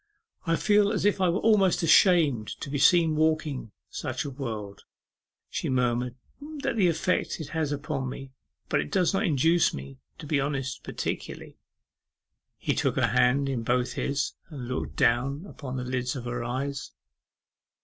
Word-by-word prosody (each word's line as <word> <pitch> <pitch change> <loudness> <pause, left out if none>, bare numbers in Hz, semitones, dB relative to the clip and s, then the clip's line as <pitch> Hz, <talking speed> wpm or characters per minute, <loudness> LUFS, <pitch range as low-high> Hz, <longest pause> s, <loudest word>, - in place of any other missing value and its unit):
'I 165 - +3
feel 205 +2 +3
as 205 - -1
if 205 -2 +2
I 185 - +4
were 175 +4 0
almost 200 -6 +3
ashamed 160 - +5
to 140 - -5
be 145 - -1
seen 165 +2 +5
walking 155 -6 0 0.2
such - - -3
a 140 - -4
world,' 110 -7 -6 0.7
she - - -3
murmured; 125 -1 0 0.3
'that's 295 -3 -4
the 195 -5 +4
effect 170 +2 0
it 155 - -6
has 160 -3 -1
upon 145 -2 -3
me; 135 +1 -8 0.4
but - - +1
it 75 - -7
does 180 +2 +2
not 195 +2 +1
induce 160 +3 +3
me 70 -1 -9 0.2
to 165 - -9
be 145 -1 +1
honest 135 -2 -3
particularly.' - - -5 1.0
He - - -1
took - - 0
her - - +2
hand 135 +3 +3
in 130 -4 -1
both 125 +2 0
his, 140 0 -1 0.2
and 135 -6 -7
looked 130 +1 -4
down 135 +8 +1
upon 140 -9 -7
the 125 - -3
lids 125 0 -2
of 125 -2 -6
her 120 0 -3
eyes. 135 +3 -4
140 Hz, 170 wpm, -27 LUFS, 125-165 Hz, 1.0 s, ashamed